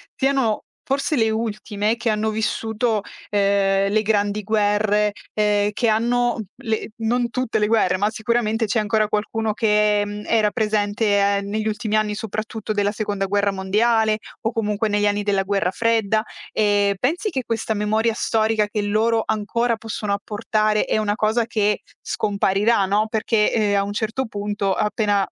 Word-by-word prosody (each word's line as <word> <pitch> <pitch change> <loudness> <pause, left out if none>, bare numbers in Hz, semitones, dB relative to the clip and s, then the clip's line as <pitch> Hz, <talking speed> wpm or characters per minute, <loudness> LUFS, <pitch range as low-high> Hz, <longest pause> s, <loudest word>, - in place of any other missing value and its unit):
siano 265 -5 +1 0.2
forse 275 +3 0
le 225 -3 +2
ultime 215 -1 -1
che 230 0 -1
hanno 215 0 0
vissuto, 220 +1 -1 0.3
ehm, 195 -1 +2
le 215 0 +3
grandi 205 -1 0
guerre 210 0 +1 0.2
e 210 -1 +2
che 230 +2 0
hanno 240 +1 +1 0.2
le 220 0 -2
non 235 +2 0
tutte 255 -1 -1
le 210 - +2
guerre, 215 -5 +2
ma 205 +2 +1
sicuramente 225 0 0
c'è 220 +2 0
ancora 215 0 +1
qualcuno 215 +1 -1
che, 210 -1 +2
mhmm, 205 0 -6
era 215 -2 +2
presente, 215 -1 0 0.3
ehm, 200 0 -4
negli 215 +1 -2
ultimi 215 0 -1
anni, 210 -1 0
soprattutto 215 0 -4
della 205 0 +1
Seconda 205 -2 -2
guerra 200 0 +1
mondiale 215 +3 +2 0.2
o 225 - -1
comunque 210 -1 -1
negli 205 0 +2
anni 205 0 0
della 200 -2 +1
Guerra 195 -2 0
Fredda. 220 -1 +1 0.3
Ehm, 205 -1 +2
pensi 340 - 0
che 265 -7 -3
questa 225 -1 -1
memoria 215 +2 +1
storica 220 -1 +1
che 210 0 -2
loro 220 +2 +1
ancora 225 +2 0
possono 215 -2 -4
apportare 215 +1 0
è - - 0
una 210 -1 0
cosa 220 +1 +1
che 210 -3 0 0.2
scomparirà, 200 +1 +1
no? 210 +2 +1
Perché, 220 -1 +1
ehm, 210 -3 +2
a 200 - +2
un 205 +1 -4
certo 225 +5 -2
punto, 205 -2 -2
appena, 210 -1 +1
215 Hz, 160 wpm, -22 LUFS, 205-225 Hz, 0.3 s, le